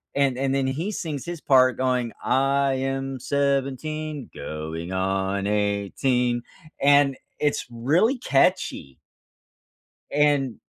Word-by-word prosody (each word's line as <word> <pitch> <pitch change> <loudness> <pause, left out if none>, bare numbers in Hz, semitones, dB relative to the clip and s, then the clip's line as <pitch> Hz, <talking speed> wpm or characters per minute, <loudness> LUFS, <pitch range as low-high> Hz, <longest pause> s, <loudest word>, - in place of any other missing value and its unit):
and 135 -3 +2
and 135 0 0
then 135 -1 +1
he 160 +10 -2
sings 155 - -4
his 170 -2 -6
part 130 -1 +4
going, 125 -3 0
I 135 +1 +2
am 135 0 -3
17 140 +2 -2
going 80 +3 -5
on 95 +1 -1
18. 105 +4 0 0.4
and 140 -1 +5 0.2
it's 150 -1 0
really 160 - +2
catchy. 100 - +1 1.1
And 145 -4 +2
135 Hz, 105 wpm, -24 LUFS, 120-140 Hz, 1.1 s, and